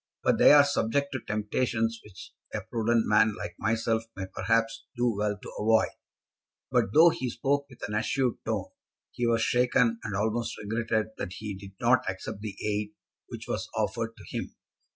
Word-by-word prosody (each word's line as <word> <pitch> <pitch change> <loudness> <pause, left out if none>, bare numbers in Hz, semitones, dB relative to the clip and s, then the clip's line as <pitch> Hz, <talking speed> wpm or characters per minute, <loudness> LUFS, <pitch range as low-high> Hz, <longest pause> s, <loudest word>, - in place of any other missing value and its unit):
But - - +2
they - - +8
are 145 -1 +8
subject 140 0 0
to 130 - -2
temptations 115 +1 -1
which 100 -3 -12 0.2
a - - -2
prudent 115 0 +1
man 110 0 +4
like 85 - -6
myself 115 +1 +1
may 95 - -4
perhaps 115 +4 0
do 120 -1 +1
well 105 0 -1
to - - -9
avoid." 110 +1 +3 0.8
But - - +3
though 160 +7 +8
he 130 -5 -3
spoke 140 +4 0
with 125 - -7
an 105 - -6
assured 125 +3 0
tone, - - -2 0.4
he 120 - -1
was 115 0 +2
shaken, 125 -3 +2
and 100 - -3
almost 110 +3 -1
regretted 110 0 -1
that 90 - -4
he 105 +1 -5
did 95 0 -10
not 120 -4 +3
accept 95 +1 -6
the 105 -3 -5
aid 105 0 -2 0.3
which - - -8
was - - -3
offered - - -2
to - - -13
him. - - -4
115 Hz, 175 wpm, -28 LUFS, 105-120 Hz, 0.8 s, they